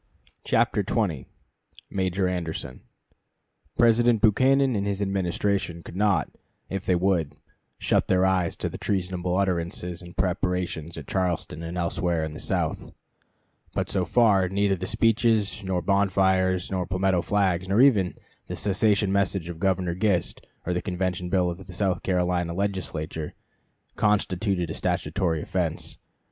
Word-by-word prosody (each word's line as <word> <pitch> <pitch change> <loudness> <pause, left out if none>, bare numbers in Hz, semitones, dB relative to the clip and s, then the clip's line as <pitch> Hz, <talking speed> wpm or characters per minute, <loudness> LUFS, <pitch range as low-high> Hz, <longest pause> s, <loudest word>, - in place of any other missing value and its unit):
CHAPTER - - +2
XX 95 - -1 0.6
MAJOR 95 0 0
ANDERSON 85 -7 -4 1.0
President 120 0 +4
Buchanan 130 +4 +4
and 100 0 -1
his 100 -1 -1
Administration 95 -2 -1
could - - -10
not, 100 -5 +2 0.4
if 95 -1 -4
they 90 - +4
would, 90 -4 +1 0.4
shut - - +1
their 95 0 +3
eyes 95 -3 +1
to - - -3
the - - -7
treasonable 90 -2 -1
utterances 90 -2 -2
and 85 -1 -12
preparations 90 -3 -1
at - - -7
Charleston 90 -4 -2
and 85 +2 -5
elsewhere 85 -1 0
in 80 -1 -4
the 75 - -8
South; - - -2 0.8
but - - -1
so - - +1
far 100 -6 +3
neither 100 0 +1
the 95 0 -5
speeches 110 -1 +2
nor 95 -2 -1
bonfires 95 -2 +2
nor 90 -2 -1
palmetto 95 -1 +1
flags, 95 -2 0
nor 100 +3 +3
even 110 -9 +4 0.3
the - - -4
secession 105 0 +2
message 95 -3 0
of 85 -2 -7
Governor 95 -2 +1
Gist 95 -2 -1 0.2
or 90 - 0
the 90 - -1
Convention 90 -1 -2
bill 90 -1 +2
of 90 +2 -9
the 90 - -9
South 95 0 0
Carolina 90 -2 0
Legislature, 80 -5 -3 0.6
constituted 95 -4 +1
a - - -3
statutory 85 -5 -1
offense. - - -3
95 Hz, 140 wpm, -26 LUFS, 90-100 Hz, 1.0 s, President